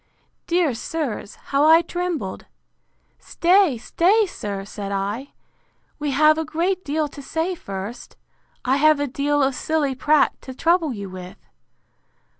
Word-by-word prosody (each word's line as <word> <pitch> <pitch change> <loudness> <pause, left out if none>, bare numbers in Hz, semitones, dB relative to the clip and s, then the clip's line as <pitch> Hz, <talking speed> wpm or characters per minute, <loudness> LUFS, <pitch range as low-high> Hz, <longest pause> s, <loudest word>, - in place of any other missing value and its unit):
—Dear 340 -5 +2
sirs, 245 -4 -4 0.2
how 280 +1 +4
I 325 +2 +7
trembled! 340 - -4 0.7
Stay, 350 -5 +3
stay, 380 - +2
sir, 200 - -5
said 200 0 -6
I: 205 +8 -3 0.7
we 295 0 -2
have 305 +3 +4
a - - 0
great 345 +4 -1
deal 300 +1 -1
to 285 - -10
say 320 +6 -2
first; 200 - -7 0.5
I 265 +2 +3
have 310 0 +4
a 290 - +1
deal 285 +2 0
of 270 0 +1
silly 295 0 0
prate 295 +3 +2
to 260 - -9
trouble 335 0 +2
you 200 -4 -6
with! 185 -1 -9
290 Hz, 140 wpm, -22 LUFS, 240-330 Hz, 0.7 s, I